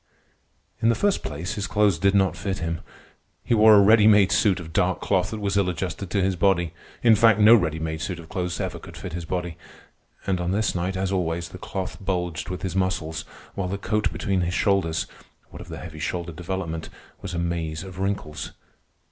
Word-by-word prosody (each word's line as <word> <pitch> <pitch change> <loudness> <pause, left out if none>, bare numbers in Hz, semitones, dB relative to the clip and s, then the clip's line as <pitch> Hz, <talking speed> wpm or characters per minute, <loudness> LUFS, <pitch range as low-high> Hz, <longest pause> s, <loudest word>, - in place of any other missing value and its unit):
In 115 - +4
the 115 - +3
first 205 -1 +1
place, 80 +7 -4
his 105 -2 -3
clothes 105 -6 +2
did 100 +2 +3
not 95 -2 +3
fit 100 -1 -3
him. 80 0 -3 0.6
He - - 0
wore 110 -1 +7
a 100 - +7
ready 105 +1 +6
made 105 -3 +6
suit 100 -5 +3
of 80 -2 -9
dark - - +1
cloth 95 -1 +1
that 110 - -5
was 100 -1 -1
ill 95 -2 +2
adjusted 90 +1 -4
to 100 -1 +1
his 95 0 +1
body. 85 -2 +2 0.3
In 115 -2 +7
fact, 110 0 +5
no 105 +2 +8
ready 85 -8 +3
made 80 0 -4
suit 90 0 -3
of 85 -2 -11
clothes 90 0 -3
ever - - -3
could - - -11
fit 90 - -7
his 85 -1 -4
body. 90 -1 -3 0.7
And 95 -2 0
on 90 +1 -1
this 110 +2 +1
night, 90 +1 -2
as 95 0 -1
always, 85 -2 -1
the 90 - -10
cloth 95 -1 -5
bulged 90 -4 -2
with 90 - -5
his 95 -1 -3
muscles, 85 -5 -1 0.3
while 95 -2 -2
the 100 +2 -3
coat 105 +1 0
between 95 -3 -1
the 85 -1 0
shoulders, 90 -3 +1 0.5
what - - -9
of - - -11
the - - -7
heavy 80 -3 -9
shoulder 85 +2 -3
development, 85 -1 -4 0.3
was 90 -2 -5
a - - -2
maze 85 -1 -2
of 95 -1 -9
wrinkles. 95 -6 -3
95 Hz, 215 wpm, -24 LUFS, 85-100 Hz, 0.7 s, no